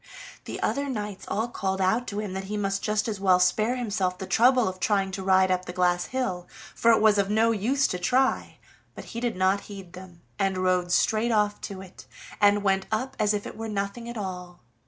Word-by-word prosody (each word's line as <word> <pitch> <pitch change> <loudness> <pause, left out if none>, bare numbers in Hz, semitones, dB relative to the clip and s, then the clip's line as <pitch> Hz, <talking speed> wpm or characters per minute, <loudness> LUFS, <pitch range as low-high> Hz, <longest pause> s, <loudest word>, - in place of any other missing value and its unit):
The - - -6
other 280 0 -1
knights 210 -5 -5
all 220 +3 -1
called 190 -5 -3
out 205 +6 +1
to 205 - -4
him 210 -3 -4
that 190 0 -4
he 210 +2 -4
might 195 -1 -1
just 210 0 0
as 210 -3 -3
well 185 -2 +4
spare 215 +7 +2
himself 200 -7 -1
the 190 - -6
trouble 245 +3 +4
of 185 0 -5
trying 195 0 +1
to 195 +1 -5
ride 190 0 +3
up 185 0 0
the 180 - -7
glass 180 -1 +1
hill, 190 -9 -3 0.3
for 230 - +2
it 230 - +6
was 215 -1 +4
of 200 0 +1
no 220 +2 +3
use 245 +6 +1
to 180 - -3
try; 255 +8 +1 0.4
but - - -8
he 230 - -3
did 240 -3 -2
not 190 +2 +2
heed 195 -4 -10
them, 180 -2 -12 0.2
and 195 -1 +1
rode 185 -1 +1
straight 220 +5 +2
off 210 -1 +1
to 195 -2 -6
it, 190 -1 -13 0.3
and 205 0 +4
went 195 -1 +1
up 255 +5 -2
as 210 -1 +2
if 205 - -4
it - - -7
were 225 0 -5
nothing 205 +3 -4
at 235 - -6
all. 180 -3 -6
200 Hz, 225 wpm, -26 LUFS, 185-220 Hz, 0.4 s, it